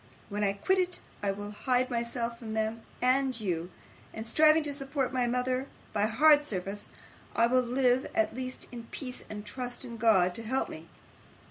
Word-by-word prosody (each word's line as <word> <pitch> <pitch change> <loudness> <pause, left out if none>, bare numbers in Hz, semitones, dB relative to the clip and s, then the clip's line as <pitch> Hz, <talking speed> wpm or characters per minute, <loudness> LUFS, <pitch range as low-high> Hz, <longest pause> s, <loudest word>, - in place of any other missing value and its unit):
When 205 +1 -2
I 200 -1 +2
quit 375 - +1
it, 360 -1 0 0.2
I 205 - 0
will 205 +1 -4
hide 255 +4 +1
myself 235 0 -2
from 220 -2 -5
them 220 +1 -1 0.2
and 260 -1 +3
you, 175 -4 -2 0.5
and, 220 +1 -5
striving 310 +5 +5
to 290 -1 -2
support 270 -1 -2
my 250 -2 +2
mother 255 +2 0 0.3
by 210 0 +2
hard 295 +6 +6
service, 200 -4 -4 0.5
I 230 - +5
will 255 +2 +4
live, 250 +1 +2
at 220 0 +2
least, 255 +1 -5
in 235 -2 -7
peace, 250 +1 -7
and 210 -1 -6
trust 245 +3 -5
in 235 -2 -7
God 195 -6 +4
to 225 - -3
help 260 +4 -1
me. 160 +1 -9
240 Hz, 185 wpm, -30 LUFS, 215-260 Hz, 0.5 s, hard